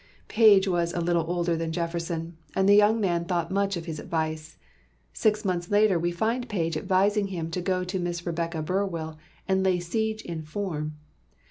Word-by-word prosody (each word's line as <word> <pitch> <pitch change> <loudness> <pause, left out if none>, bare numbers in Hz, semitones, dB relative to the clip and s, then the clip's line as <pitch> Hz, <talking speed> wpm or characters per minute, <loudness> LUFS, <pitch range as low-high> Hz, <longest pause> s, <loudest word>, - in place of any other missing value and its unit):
Page 210 -3 +6
was 170 -2 0
a - - 0
little 170 -1 +1
older 175 -1 0
than 165 0 -2
Jefferson, 170 0 -3 0.2
and 190 0 +2
the 200 - +7
young 210 +2 +5
man 175 -5 +1
thought 170 -1 -2
much 195 -1 0
of 165 - -6
his 160 -3 -5
advice. 160 -1 -3 0.6
Six 215 -1 +1
months 175 -2 -1
later 205 -3 +4
we 175 +1 0
find 230 +7 -1
Page 165 -6 -1
advising 195 +5 +2
him 165 -4 -4
to 180 - -2
go 185 0 0
to 185 +1 -3
Miss 175 0 -3
Rebecca 165 -2 -2
Burwell 165 -3 -2 0.3
and 190 0 +2
"lay 185 -2 +2
siege 220 +5 -2
in 165 -2 -5
form." 155 -2 -4
175 Hz, 185 wpm, -26 LUFS, 165-195 Hz, 0.6 s, the